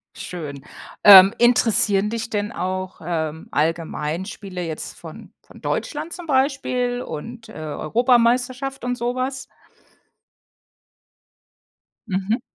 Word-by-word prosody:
Schön. 145 -6 -7 0.4
Ähm, 195 -1 +10
interessieren 215 -4 +3
dich 230 0 -4
denn 205 0 -2
auch, 185 +1 -4
ähm, 160 -2 -3
Allgemeinspiele 170 +4 -3
jetzt 160 -1 -6
von - - -11
von - - -17
Deutschland 315 +3 -3
zum 350 -1 -8
Beispiel 260 -3 0
und, 225 +8 -8
äh, - - -12
Europameisterschaft 245 - 0
und 245 0 -1
so 240 +1 -2
was? 260 +1 -3 2.6
Mhm. 195 +4 -1
215 Hz, 100 wpm, -22 LUFS, 175-250 Hz, 2.6 s, Ähm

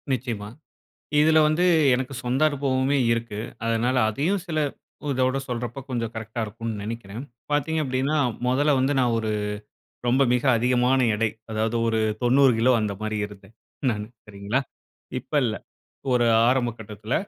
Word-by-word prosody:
நிச்சயமா, 115 -5 -3 0.7
இதில 155 +1 +5
வந்து 155 +4 +2 0.3
எனக்கு 130 +2 -4
சொந்த 125 +3 0
அனுபவமே 135 -1 0
இருக்கு. 115 -2 -2 0.3
அதனால 115 +3 +1
அதையும் 165 - 0
சில 155 -2 -1 0.5
இதோட 130 0 +1
சொல்றப்போ, 120 +1 -4
கொஞ்சம் 115 -3 -2
கரெக்ட்டா 110 +1 -5
இருக்கும்னு 110 0 -5
நெனைக்கிறேன். 115 +1 -6 0.3
பாத்தீங்க 150 +2 +1
அப்படின்னா, 130 +3 0 0.3
மொதல்ல 140 +4 +3
வந்து 135 +2 +2
நான் 120 -2 +2
ஒரு 110 -1 -1 0.8
ரொம்ப 130 +3 +4
மிக 125 - 0
அதிகமான 125 +2 +2
எடை. 115 +1 +1 0.2
அதாவது, 110 +1 -1
ஒரு 110 -1 +1 0.2
90 130 +2 +5
கிலோ 125 +3 +4
அந்த 105 -1 -1
மாரி 110 0 -2
இருந்தேன். 105 +1 -15 0.4
நானு 105 -2 -3 0.2
சரிங்களா, 105 +5 -2 0.6
இப்ப 125 - -32
இல்லை. 110 -2 -1 0.5
ஒரு 120 -1 +3 0.2
ஆரம்ப 125 -1 +2
கட்டத்தில. 110 +2 -5
120 Hz, 140 wpm, -24 LUFS, 110-130 Hz, 0.8 s, இதில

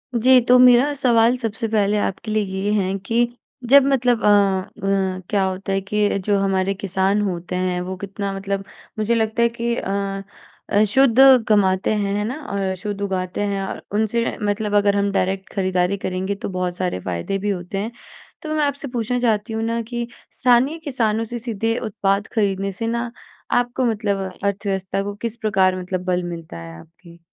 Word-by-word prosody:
जी, 255 +3 +6
तो 250 +1 +5
मेरा 250 +3 +6
सवाल 240 -3 +3
सबसे 225 -2 -3
पहले 210 -1 +1
आपके 205 +2 -3
लिए 215 0 +1 0.2
ये 205 - +1
है 195 -2 +1
कि 230 - -3 0.5
जब 280 0 +8
मतलब 250 -4 +2
अ, - - +3
अ, 195 -1 +1
क्या 200 -2 +2
होता 190 +1 -3
है 195 - 0
कि 205 +1 0
जो 205 -1 +2
हमारे 195 0 +1
किसान 195 +1 0
होते 180 -2 -3
हैं, 180 -1 -1
वो 185 +1 -4
कितना 200 +1 -4
मतलब 195 0 -3 0.4
मुझे 220 +2 +1
लगता 220 +1 0
है 235 - +4
कि 235 0 -2
अ, 195 -2 -3 0.5
अ, 205 - +4
शुद्ध 250 +2 +3 0.3
कमाते 195 -2 +3
हैं, 200 -2 -1
है 210 - 0
ना? 250 - -3 0.2
और 195 -1 -1
शुद्ध 200 +2 -5
उगाते 185 -1 -2
हैं 200 -1 -1
और 190 - -5
उनसे 220 +2 0
मतलब 205 0 -1
अगर 205 0 +3
हम 200 0 +1
डायरेक्ट 190 0 -1
खरीदारी 185 0 0
करेंगे, 190 +1 -3
तो 200 - -6
बहुत 180 -1 -2
सारे 180 - -2
फ़ायदे 90 - -3
भी 205 +2 -2
होते 180 0 -3
हैं। 210 +4 -3 0.5
तो 310 -1 -4
मैं 305 - +2
आपसे 285 0 -3
पूछना 245 -1 -2
चाहती 225 -2 0
हूँ 220 0 -2
ना 230 +1 -1
कि 235 +1 -4 0.2
स्थानीय 255 +5 +3
किसानों 230 -8 -1
से 240 +2 -5
सीधे 225 0 -2
उत्पाद 200 -1 0
खरीदने 195 -3 0
से 225 +4 -4
ना, 235 +1 -2 0.4
आपको 245 +1 +1
मतलब 215 -3 0 0.3
अर्थव्यवस्था 195 -1 -1
को 205 0 -5
किस 230 +2 -5
प्रकार 190 -5 +2
मतलब 180 0 -4
बल 180 -1 0
मिलता 165 - -7
है 85 0 -9
आपकी? 170 - -17
205 Hz, 185 wpm, -21 LUFS, 190-230 Hz, 0.5 s, जब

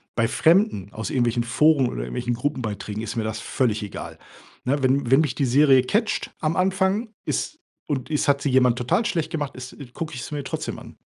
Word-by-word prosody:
Bei 115 -1 +2
Fremden 160 - +2
aus 110 - -4
irgendwelchen 120 -2 +1
Foren 135 +3 +3
oder - - -4
irgendwelchen 60 - -2
Gruppenbeiträgen 110 -6 -3
ist 110 - -5
mir 115 - -1
das 110 0 -3
völlig 115 -5 0
egal, 105 -1 -7 0.5
ne? 135 +2 0
Wenn 130 -1 +2
wenn 135 +4 +6
mich 150 -6 0
die 140 - +1
Serie 135 +1 +5
catcht 215 - 0
am 155 +1 0
Anfang 190 +4 +1 0.2
ist 310 - -2 0.3
und 145 -1 -3
es 150 - 0
hat 140 -1 +3
sie 145 - +1
jemand 125 -2 +4
total 125 - +1
schlecht 165 -5 -1
gemacht 150 -5 -3
ist 125 0 -9 0.2
gucke 165 +2 -5
ich 125 - -5
sie 150 - -6
mir 145 - -3
trotzdem - - -4
an. - - -13
135 Hz, 205 wpm, -24 LUFS, 120-155 Hz, 0.5 s, wenn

